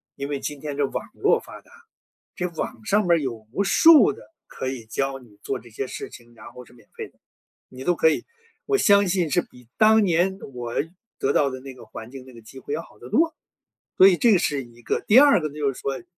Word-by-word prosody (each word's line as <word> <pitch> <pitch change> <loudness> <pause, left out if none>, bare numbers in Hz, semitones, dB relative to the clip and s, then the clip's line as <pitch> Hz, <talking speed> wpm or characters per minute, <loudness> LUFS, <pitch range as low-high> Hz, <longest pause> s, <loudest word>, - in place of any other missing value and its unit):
因 140 +1 -6
为 145 -1 -3
今 145 0 -6
天 145 -2 -5
这 145 - +2
网 - - -5
络 - - +2
发 - - -12
达， - - -26 0.7
这 180 - -1
网 115 -8 -6
上 210 +2 +2
面 175 - +1
儿 170 - +4
有 115 -6 -5
无 200 +10 -1
数 320 - +6
的 - - -14 0.2
可 130 - -5
以 125 -4 -7
教 135 +4 -3
你 110 -5 -20
做 - - -3
这 120 - -16
些 125 +4 -5
事 - - -7
情， 120 -1 -15
然 115 - -13
后 125 - -11
是 - - -21
免 115 -4 -21
费 - - -7
的， - - -36 0.5
你 130 0 -11
都 175 +3 +1
可 - - +4
以 155 - -1 0.4
我 410 -1 +1
相 200 - +4
信 175 -3 0
是 135 - +2
比 125 -1 -18
当 220 0 +5
年 185 +2 +1
我 120 -1 -6 0.5
得 135 - 0
到 140 -2 +2
的 130 - -7
那 135 0 -10
个 125 - -14
环 110 +1 -10
境、 135 -2 -10
那 130 - -15
个 115 - -13
机 125 +4 -13
会 145 - -6
要 160 - -2
好 105 - -18
得 120 +3 -12
多。 325 - +1 0.6
所 190 - +9
以 185 - +3
这 230 +5 +4
个 195 - +5
是 145 -5 -1
一 120 0 -18
个， - - -2
第 220 - +5
二 285 0 +7
个 155 -3 -3
呢 - - -15
就 145 -2 -1
是 130 - -10
说， 140 +4 -4
140 Hz, 275 characters per minute, -23 LUFS, 125-180 Hz, 0.7 s, 所